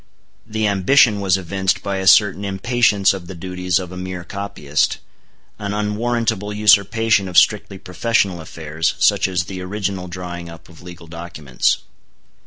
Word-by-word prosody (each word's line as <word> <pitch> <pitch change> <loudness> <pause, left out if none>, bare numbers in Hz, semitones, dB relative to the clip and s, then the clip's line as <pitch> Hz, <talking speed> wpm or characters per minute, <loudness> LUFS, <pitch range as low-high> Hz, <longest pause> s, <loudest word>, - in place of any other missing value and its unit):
The 110 0 -2
ambition 105 +2 +3
was 95 -1 +2
evinced 95 +2 -1
by 100 -1 -2
a 95 0 -3
certain 100 0 +5
impatience 100 0 +2
of 95 -3 -8
the 95 - -8
duties 90 +1 -2
of 90 -2 -5
a 90 - -8
mere 90 -1 -6
copyist, 95 -7 -2 0.6
an 100 0 -3
unwarrantable 105 0 -1
usurpation 105 0 +3
of 90 - -3
strictly 105 -2 +3
professional 95 -1 -1
affairs, 80 0 -3
such - - +3
as 90 -2 -1
the 95 0 -7
original 95 -1 -4
drawing 90 -1 -7
up 85 -1 -13
of 85 0 -16
legal 90 -1 -11
documents. 80 -6 -2
95 Hz, 150 wpm, -19 LUFS, 90-105 Hz, 0.6 s, certain